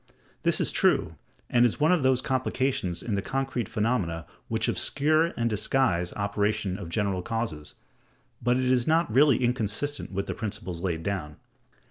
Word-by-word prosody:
This - - +3
is - - +2
true; 80 - +2 0.3
and 120 0 +3
is 120 - +2
one 155 +3 +4
of 180 -4 +3
those 130 -1 +2
complications 130 -8 -1
in 115 - -3
the 100 - 0
concrete 135 -1 -2
phenomena 100 -8 -1 0.2
which - - -1
obscure 155 +3 +2
and 115 - +1
disguise 105 -5 +1
the - - -11
operation 100 -1 -1
of 85 - -7
general 100 0 -1
causes; 110 -9 -4 0.7
but 125 +1 +2
it 130 - 0
is 125 -1 +2
not 160 -6 +2
really 135 -1 +5
inconsistent 125 +4 -1
with 100 0 -2
the - - -3
principles 105 -6 -5
laid 85 -3 -2
down. 80 -7 -3
115 Hz, 165 wpm, -27 LUFS, 95-130 Hz, 0.7 s, really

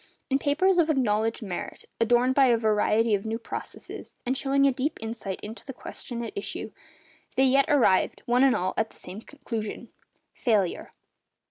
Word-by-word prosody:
In 270 - +3
papers 350 +7 +3
of 325 -1 +3
acknowledged 225 -5 +1
merit, 185 -4 -5
adorned 240 +3 +3
by 270 0 +5
a 235 -2 +4
variety 220 0 +2
of 200 -1 +1
new 225 +1 -2
processes, 230 - -8
and 255 +2 0
showing 275 +1 +2
a 275 - +5
deep 270 +4 -2
insight 220 -4 -5
into 220 +2 -8
the 270 - -7
question 235 -2 -6
at 235 - -6
issue, 405 - -4 0.6
they 265 - +4
yet 275 +1 +4
arrived, 245 - +3
one 245 +2 +3
and 270 -2 +5
all, 185 +1 -1
at 220 0 +1
the - - -18
same 190 +4 -8
conclusion—failure. 225 - -3
240 Hz, 165 wpm, -27 LUFS, 220-270 Hz, 0.6 s, by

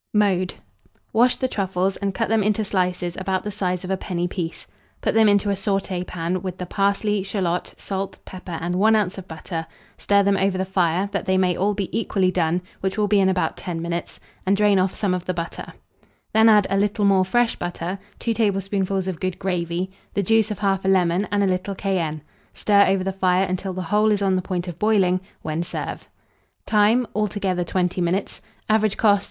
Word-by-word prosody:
Mode. 190 -3 +2 0.6
Wash 245 +2 +4
the 260 - -1
truffles 190 -3 -1
and 200 -1 -1
cut 225 - 0
them 225 -1 +2
into 215 +2 +1
slices 180 -3 -1
about 190 0 -1
the 210 - -4
size 185 -3 -2
of 185 - -4
a 190 - +1
penny 175 -2 -2
piece; 175 -2 -5 0.3
put - - 0
them 220 -1 +5
into 205 0 +3
a - - +2
sauté 195 -2 -1
pan, 175 +1 -2
with 185 -1 -5
the 180 - -4
parsley, 200 +2 +1
shalot, 185 -3 -2
salt, 195 0 -4
pepper, 180 -2 -7
and 175 +2 -1
1 220 +3 +5
oz. 200 -3 0
of 185 - -11
butter; 165 +1 -5 0.3
stir 200 0 +3
them 200 0 +2
over 190 0 +1
the 190 - -1
fire, 185 0 +1
that 200 - -2
they 190 0 +3
may 180 -2 +2
all 200 +3 +1
be 195 -1 -3
equally 195 -4 +1
done, 175 0 0 0.2
which 190 +2 -2
will 210 -1 +2
be 205 0 +3
in 190 -1 +4
about 185 -1 0
10 175 -2 -4
minutes, 170 +1 -4 0.2
and 195 +1 +2
drain 205 -2 +4
off 185 0 +2
some 200 -3 -1
of 180 -1 -3
the 185 - -2
butter; 170 -1 -5 0.6
then 220 +1 +6
add 210 -2 +6
a 195 - +2
little 205 +1 +1
more 195 -1 +4
fresh 235 +5 +1
butter, 175 +2 -4 0.2
2 230 - -1
tablespoonfuls 195 -3 0
of 180 -4 -3
good 185 -1 -2
gravy, 180 -1 -2 0.2
the 200 - +1
juice 225 +3 +3
of 210 - -5
1/2 195 -1 +1
lemon, 185 +1 +2
and 205 0 +2
a - - +3
little 185 +1 -1
cayenne; 170 -7 -2 0.3
stir 200 -1 +4
over 195 -1 +2
the 195 0 -2
fire 185 0 +2
until 185 +1 -3
the 185 0 -4
whole 210 +5 +2
is 205 -1 +1
on 190 -1 +2
the 185 - +1
point 180 -1 -3
of 175 -1 -7
boiling, 190 -4 +3 0.2
when 155 +1 -2
serve. 175 - -5 0.6
Time. 220 +4 +3
Altogether, 200 -3 -1
20 180 +1 -1
minutes. 180 +3 -1 0.3
Average 215 -1 +2
cost. 205 -2 +4
190 Hz, 205 wpm, -23 LUFS, 180-205 Hz, 0.6 s, then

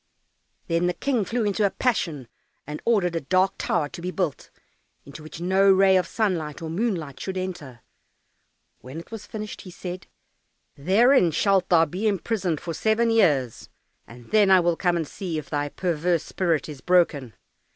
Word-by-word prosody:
Then 170 +1 0
the 180 - -1
King 255 -6 0
flew 230 +1 -1
into 205 +1 0
a 200 - +4
passion, 165 - -1 0.4
and 150 +1 -7
ordered 195 -7 +2
a 165 - -1
dark 185 +6 +2
tower 160 -4 0
to 170 - -9
be 180 - -3
built, 180 -6 -3 0.6
into 140 +2 -11
which 155 +1 -10
no 190 +3 +3
ray 190 0 +5
of 180 -2 +2
sunlight 170 -10 -2
or 160 -1 -6
moonlight 165 - -2
should 190 +4 -5
enter. 170 -10 -6 1.0
When 130 +6 -9
it 170 - -13
was 225 -2 -8
finished, 215 -1 -7
he 185 - -11
said, 180 +1 -8 0.7
"Therein 195 - +4
shalt 190 +3 +1
thou 165 -2 +5
be 185 +8 -3
imprisoned 190 -4 -1
for 165 - -5
seven 220 +6 +1
years, 145 - +1 0.4
and 120 +1 -14
then 210 -2 +4
I 190 -1 +7
will 175 -1 +1
come 175 0 +1
and 160 -3 -3
see 175 -1 -5
if 155 - -7
thy 145 -1 -1
perverse 170 0 -1
spirit 165 -6 -1
is 145 -4 -9
broken." 165 -9 +1
180 Hz, 175 wpm, -24 LUFS, 155-195 Hz, 1.0 s, I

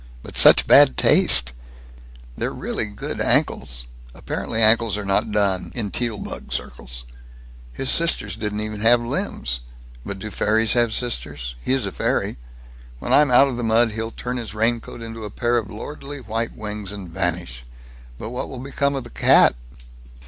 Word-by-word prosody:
But - - -12
such - - +7
bad 65 - +6
taste! 60 +1 +7 0.8
They're - - -3
really - - -3
quite 105 -1 -11
good - - -5
ankles. 65 -3 0 0.3
Apparently 110 - -5
ankles 110 -1 +3
are 105 - -6
not 100 +2 0
done, 100 -3 0
in 105 -5 -2
Teal 120 -3 -1
bug - - -9
circles. - - -5 0.7
His 130 - 0
sisters 170 0 +3
don't 105 -1 -4
even 105 -1 -6
have 120 +2 +4
limbs. 65 - -3 0.4
But 100 - -7
do 105 +2 -8
fairies 110 +1 +1
have 120 -2 +2
sisters? 75 - -3
He - - -1
is 130 -5 +1
a 100 - -4
fairy. - - -2 0.6
When - - -3
I'm 150 -1 +5
out 125 +3 +5
of 125 - -5
the 120 - -4
mud 115 +1 +2
he'll 110 +1 -4
turn 125 +2 -6
his 115 -3 -6
raincoat 115 +1 -2
into 115 0 -8
a 105 - -6
pair 120 +3 -1
of 105 -3 -9
lordly 145 +6 -8
white 115 -1 -5
wings, 105 -2 -5
and 100 -3 -8
vanish. 85 -8 -4 0.5
But 110 - -7
what 125 - -5
will 130 - -8
become 140 +2 -2
of 135 - -4
the 120 - -13
cat?" - - +4
110 Hz, 175 wpm, -21 LUFS, 100-120 Hz, 0.8 s, such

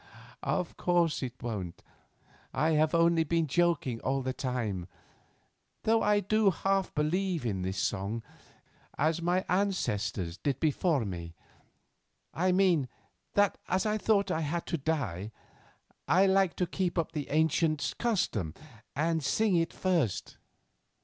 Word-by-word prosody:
"Of - - -2
course 175 -3 +2
it 125 -2 -4
won't. 100 -8 -5 0.7
I 160 +1 +2
have 155 +1 +3
only 170 0 +4
been 165 +1 +1
joking 155 -6 +1
all 135 +2 -1
the 130 0 -2
time, 115 -10 -3 1.0
though 225 +1 +3
I 205 0 +3
do 215 +1 +3
half 195 +2 0
believe 170 +1 0
in 100 -5 -1
this 95 +1 -3 0.2
old 95 - -4
song, 110 +4 -4 0.7
as 160 +3 +1
my 180 +2 +1
ancestors 105 - -1
did 135 +2 -1
before 155 -3 +1
me. 85 -3 -6 1.0
I 185 +2 +2
mean, 180 -8 +3 0.5
that 205 -1 +3
as 185 +2 +1
I 215 0 +1
thought 200 -3 +2
I 160 - 0
had 165 +3 -2
to 170 - -2
die, 115 - -2 0.8
I 185 +3 +5
liked 190 -2 +3
to 180 - +1
keep 180 0 -2
up 165 -1 0
the 150 -4 -4
ancient 155 0 +1
custom 120 - 0 0.4
and 160 +2 0
sing 215 - +2
it 165 -1 +1
first. 170 - -1
160 Hz, 140 wpm, -30 LUFS, 125-185 Hz, 1.0 s, I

